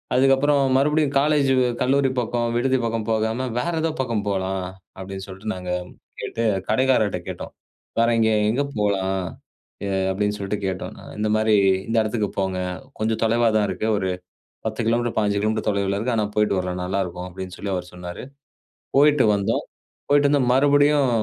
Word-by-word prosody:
அதுக்கப்புறம் 135 Hz, +2 st, +4 dB, 0.2 s
மறுபடியும் 150 Hz, +1 st, +2 dB
"காலேஜு 145 Hz, -2 st, +3 dB, 0.3 s
கல்லூரி 135 Hz, +1 st, +3 dB
பக்கம், 120 Hz, 0 st, -1 dB
விடுதி 130 Hz, +2 st, +2 dB
பக்கம் 115 Hz, -1 st, -2 dB
போகாம, 110 Hz, +3 st, 0 dB
வேற 170 Hz, +7 st, -1 dB
ஏதோ 165 Hz, 0 st, 0 dB
பக்கம் 115 Hz, -5 st, -2 dB
போலாம்" 95 Hz, -1 st, -1 dB, 0.3 s
அப்டின்னு 95 Hz, 0 st, -6 dB
சொல்ட்டு 100 Hz, +4 st, -5 dB
நாங்க 90 Hz, -1 st, -5 dB, 0.5 s
கேட்டு, 115 Hz, -, -3 dB, 0.2 s
கடைக்காரர்ட்ட 125 Hz, -8 st, +2 dB
கேட்டோம். -, -, -7 dB, 0.5 s
"வேற 115 Hz, -, +4 dB
இங்க 110 Hz, 0 st, +3 dB, 0.2 s
எங்க 125 Hz, +6 st, +1 dB
போலாம்?" 95 Hz, -2 st, 0 dB, 0.7 s
எ -, -, -2 dB, 0.2 s
அப்டின்னு 105 Hz, +2 st, 0 dB
சொல்ட்டு 100 Hz, +1 st, -2 dB
கேட்டோம். 95 Hz, -1 st, -4 dB, 0.2 s
"இந்த 105 Hz, 0 st, 0 dB
மாரி 110 Hz, 0 st, +3 dB, 0.3 s
இந்த 115 Hz, -, 0 dB
இடத்துக்கு 110 Hz, -1 st, -1 dB
போங்க. 95 Hz, -1 st, -1 dB, 0.4 s
கொஞ்சம் 110 Hz, 0 st, 0 dB
தொலைவா 115 Hz, +1 st, +3 dB
தான் 105 Hz, -, +2 dB
இருக்கு. 95 Hz, +4 st, -2 dB
ஒரு 95 Hz, -2 st, -1 dB, 0.6 s
10 110 Hz, +1 st, -3 dB
கிலோமீட்டர் 120 Hz, 0 st, +1 dB
15 105 Hz, -1 st, +1 dB
கிலோமீட்டர் 110 Hz, +1 st, -1 dB
தொலைவுல 100 Hz, -1 st, 0 dB
இருக்கு. 120 Hz, +3 st, -1 dB
ஆனா, 110 Hz, -, +2 dB
போயிட்டு 105 Hz, -2 st, +2 dB
வரலாம். 90 Hz, 0 st, -3 dB
நல்லாருக்கும்" 90 Hz, -1 st, -3 dB
அப்டின்னு 95 Hz, 0 st, -7 dB
சொல்லி 100 Hz, -1 st, -3 dB
அவரு 90 Hz, 0 st, -4 dB
சொன்னாரு, 90 Hz, -1 st, -7 dB, 0.8 s
போயிட்டு 145 Hz, -1 st, +5 dB
வந்தோம். 100 Hz, -1 st, 0 dB, 0.5 s
போயிட்டு 145 Hz, 0 st, +5 dB
வந்து 145 Hz, -1 st, +3 dB
கி -, -, 0 dB
மறுபடியும் 145 Hz, 0 st, +4 dB
110 Hz, 160 wpm, -23 LUFS, 95-130 Hz, 0.8 s, போயிட்டு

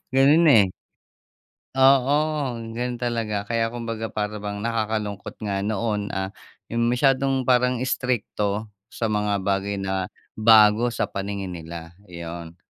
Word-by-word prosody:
Ganun, 145 Hz, +5 st, +5 dB
eh. 105 Hz, -8 st, +6 dB, 1.0 s
Oo. 135 Hz, +1 st, +5 dB, 0.6 s
Ganun 120 Hz, +2 st, -3 dB
talaga 115 Hz, -4 st, -2 dB
kaya 115 Hz, +2 st, 0 dB
kumbaga 115 Hz, -1 st, -4 dB
para 105 Hz, -1 st, -3 dB
bang 105 Hz, 0 st, -5 dB
nakakalungkot 110 Hz, -3 st, -2 dB
nga 100 Hz, -2 st, -1 dB
noon, 105 Hz, 0 st, -1 dB
ah, 95 Hz, 0 st, -2 dB, 0.4 s
yung 115 Hz, 0 st, +1 dB
masyadong 135 Hz, +1 st, +2 dB
parang 125 Hz, 0 st, +2 dB
istrikto 110 Hz, -5 st, -1 dB, 0.2 s
sa 115 Hz, -2 st, -3 dB
mga 105 Hz, -2 st, 0 dB
bagay 100 Hz, +1 st, 0 dB
na 95 Hz, -1 st, -2 dB, 0.3 s
bago 110 Hz, +1 st, +6 dB
sa 120 Hz, -, -1 dB
paningin 100 Hz, -1 st, -4 dB
nila, 85 Hz, -1 st, -8 dB, 0.2 s
yun. 85 Hz, -1 st, -8 dB
110 Hz, 125 wpm, -24 LUFS, 100-120 Hz, 1.0 s, eh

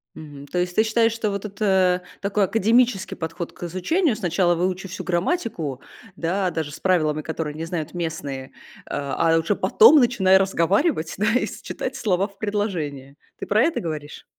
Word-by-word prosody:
Мгм. 145 Hz, -2 st, -10 dB
То 180 Hz, -, -3 dB
есть 180 Hz, 0 st, -1 dB
ты 220 Hz, -, +4 dB
считаешь, 225 Hz, +1 st, +2 dB
что 225 Hz, -2 st, -2 dB
вот 200 Hz, 0 st, -4 dB
это 190 Hz, -3 st, +1 dB, 0.2 s
такой 200 Hz, +1 st, +1 dB
академический 225 Hz, +1 st, +2 dB
подход 165 Hz, +1 st, -5 dB
к -, -, -19 dB
изучению? 220 Hz, -, 0 dB
Сначала 175 Hz, -3 st, +1 dB
выучи 185 Hz, +2 st, -2 dB
всю 180 Hz, -, -7 dB
грамматику, 175 Hz, -, -2 dB, 0.4 s
да, 185 Hz, +2 st, 0 dB
даже 160 Hz, -3 st, -4 dB
с 155 Hz, -, -10 dB
правилами, 155 Hz, -5 st, +1 dB
которые 160 Hz, -1 st, -4 dB
не 160 Hz, +2 st, -5 dB
знают 165 Hz, -2 st, -4 dB
местные. 145 Hz, -6 st, -5 dB, 0.3 s
Э, -, -, -17 dB
а 145 Hz, +3 st, +1 dB
уже 165 Hz, +1 st, 0 dB
потом 440 Hz, -8 st, +6 dB
начинай 195 Hz, -7 st, +4 dB
разговаривать, 190 Hz, -, +1 dB
да, 210 Hz, -, +1 dB
и -, -, -1 dB
с -, -, -8 dB
читать 260 Hz, -, -5 dB
слова 195 Hz, -6 st, +1 dB
в 200 Hz, -1 st, -20 dB
предложении. 165 Hz, -11 st, -3 dB, 0.2 s
Ты -, -, -6 dB
про 210 Hz, +2 st, +3 dB
это 335 Hz, -, +1 dB
говоришь? 150 Hz, -3 st, -6 dB
180 Hz, 175 wpm, -23 LUFS, 160-210 Hz, 0.4 s, потом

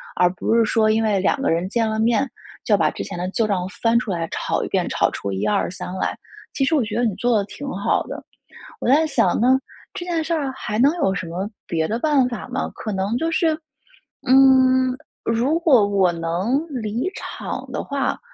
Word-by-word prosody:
而 180 Hz, 0 st, +4 dB
不 225 Hz, -, 0 dB
是 230 Hz, -, +5 dB
说 220 Hz, 0 st, +2 dB
因 225 Hz, +1 st, +2 dB
为 210 Hz, -3 st, +2 dB
两 190 Hz, +8 st, +1 dB
个 -, -, +1 dB
人 170 Hz, +3 st, 0 dB
见 225 Hz, +2 st, 0 dB
了 220 Hz, 0 st, -2 dB
面， 240 Hz, +4 st, +2 dB, 0.3 s
就 -, -, -4 dB
要 -, -, +6 dB
把 155 Hz, -4 st, +2 dB
之 -, -, -5 dB
前 -, -, -7 dB
的 180 Hz, -, -2 dB
旧 225 Hz, -, +1 dB
账 185 Hz, -3 st, -1 dB
翻 230 Hz, 0 st, +3 dB
出 225 Hz, -, -6 dB
来 170 Hz, -2 st, -1 dB
吵 -, -, -1 dB
一 -, -, -4 dB
遍， -, -, 0 dB
吵 -, -, +1 dB
出 100 Hz, -, -4 dB
一 95 Hz, +2 st, -3 dB
二 105 Hz, -, +1 dB
三 180 Hz, -, -6 dB
来。 -, -, -1 dB, 0.4 s
其 275 Hz, -, 0 dB
实 295 Hz, +4 st, +2 dB
我 280 Hz, -, +2 dB
觉 215 Hz, -1 st, -4 dB
得 240 Hz, -, +1 dB
你 225 Hz, -4 st, +1 dB
做 240 Hz, +2 st, +1 dB
得 200 Hz, -, +1 dB
挺 280 Hz, +7 st, -8 dB
好 200 Hz, -5 st, 0 dB
的。 -, -, -8 dB, 0.6 s
我 -, -, -3 dB
在 300 Hz, +5 st, +5 dB
想 230 Hz, -, +2 dB
呢， 260 Hz, +2 st, +4 dB, 0.3 s
这 350 Hz, -, -6 dB
件 335 Hz, -3 st, -1 dB
事 335 Hz, -, -2 dB
儿 290 Hz, -5 st, -1 dB
还 210 Hz, -4 st, -4 dB
能 280 Hz, +5 st, +5 dB
有 235 Hz, -, +1 dB
什 185 Hz, -, -4 dB
么 185 Hz, +5 st, -4 dB, 0.2 s
别 160 Hz, -2 st, -1 dB
的 225 Hz, -, 0 dB
办 280 Hz, -4 st, +3 dB
法 240 Hz, -2 st, -6 dB
吗？ 265 Hz, -, -2 dB
可 215 Hz, -, -5 dB
能 195 Hz, +4 st, -1 dB
就 325 Hz, +4 st, -1 dB
是 320 Hz, -2 st, +1 dB, 0.7 s
嗯， 260 Hz, -1 st, +5 dB, 0.3 s
如 245 Hz, +8 st, +1 dB
果 265 Hz, -11 st, +5 dB
我 195 Hz, -3 st, +3 dB
能 175 Hz, -, -1 dB
离 240 Hz, -, -2 dB
场 -, -, -6 dB
的 -, -, -3 dB
话， 280 Hz, -1 st, -2 dB
230 Hz, 240 characters per minute, -21 LUFS, 195-270 Hz, 0.7 s, 要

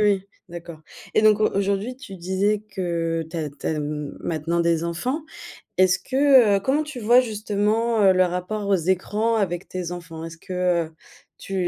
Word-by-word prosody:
oui, 205 Hz, -2 st, +3 dB, 0.3 s
d'accord. 170 Hz, -2 st, -9 dB, 0.3 s
Et -, -, +5 dB
donc 215 Hz, -1 st, +5 dB
au 215 Hz, -, +4 dB
aujourd'hui 200 Hz, +5 st, -1 dB
tu 250 Hz, -8 st, -10 dB
disais 190 Hz, +4 st, 0 dB
que 165 Hz, -3 st, -1 dB
tu 175 Hz, -, -6 dB
as 155 Hz, -3 st, -2 dB
tu 140 Hz, 0 st, -9 dB
as, 155 Hz, -, 0 dB
mmh, 150 Hz, -1 st, -4 dB
maintenant 165 Hz, +1 st, -1 dB
des 170 Hz, -1 st, +1 dB
enfants, 245 Hz, -, -2 dB, 0.6 s
est-ce 185 Hz, -1 st, +4 dB
que, 260 Hz, -4 st, +4 dB
heu -, -, 0 dB
comment 270 Hz, +9 st, +1 dB
tu 300 Hz, -4 st, -8 dB
vois 240 Hz, +3 st, +6 dB
justement, 215 Hz, 0 st, 0 dB
heu, 190 Hz, -1 st, +7 dB
le 185 Hz, 0 st, +4 dB
rapport 180 Hz, +4 st, -3 dB
aux 200 Hz, -, +4 dB
écrans 195 Hz, +6 st, 0 dB
avec 180 Hz, -4 st, -1 dB
tes 180 Hz, -1 st, -4 dB
enfants? 165 Hz, -2 st, -8 dB
Est-ce 165 Hz, 0 st, -8 dB
que, 180 Hz, -2 st, 0 dB
heu, 160 Hz, -, -16 dB, 0.5 s
tu 195 Hz, -, -7 dB
190 Hz, 185 wpm, -23 LUFS, 170-215 Hz, 0.6 s, heu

